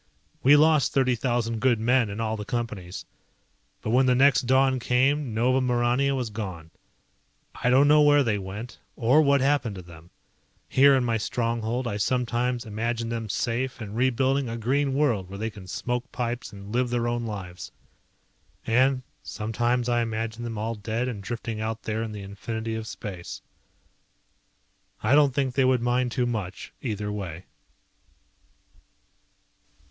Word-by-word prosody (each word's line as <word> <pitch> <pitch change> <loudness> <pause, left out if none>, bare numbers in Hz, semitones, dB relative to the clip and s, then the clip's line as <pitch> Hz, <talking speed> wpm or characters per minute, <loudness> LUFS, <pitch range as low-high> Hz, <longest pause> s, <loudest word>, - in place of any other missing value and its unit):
We 140 +3 +7
lost 155 -2 +4
thirty 130 -2 +3
thousand 120 -1 -1
good 120 -2 +2
men 120 0 +2
in 100 +2 -6
all 110 -1 -1
the 105 - -5
Companies. 105 -5 -4 0.8
But 110 - -2
when 130 +2 +4
the 125 - +4
next 135 -1 +4
dawn 130 0 +3
came 130 +3 +1
Nova 130 +4 +2
Maurania 125 +2 +1
was 125 -4 -3
gone. 95 -7 -6 0.8
I 125 - -1
don't 135 +3 +5
know 150 +1 +6
where 145 -1 +5
they 110 -4 0
went, 100 +5 -7 0.2
or 130 +6 +4
what 140 -2 +3
happened 135 -6 +1
to 95 - -8
them. 85 -1 -14 0.6
Here 140 +1 +5
in 130 - +2
my 115 -2 +1
stronghold 115 +2 -2
I 105 -2 -2
sometimes 125 +2 0
imagine 115 +2 -2
them 115 -2 -4
safe 120 +5 -2
and 105 -2 -7
rebuilding 130 +2 +1
a 115 - -4
green 135 +4 0
world 120 -11 +1
where 100 - -7
they 110 +2 -3
can 100 -3 -12
smoke 125 +6 -3
pipes 120 0 -3
and 100 -1 -10
live 125 0 +1
their 120 -1 0
own 120 0 -2
lives. 95 -4 -7 0.9
And 130 +3 +2 0.2
sometimes 120 +3 -1
I 120 -1 +2
imagine 115 0 -3
them 115 -2 -5
all 110 +2 -2
dead 115 +3 -3
and 105 -5 -5
drifting 115 +1 -5
out 110 0 -3
there 110 0 -2
in 115 -1 -4
the 105 -2 -7
infinity 110 +3 -5
of 110 0 -4
space. 95 -6 -7 1.6
I 110 +5 +3
don't 145 -3 +5
think 135 -3 0
they 135 - +2
would 130 -2 +2
mind 125 0 +1
too 125 0 0
much, 105 -6 -4
either 105 -4 -3
way. 95 -4 -6
120 Hz, 165 wpm, -26 LUFS, 110-130 Hz, 1.6 s, We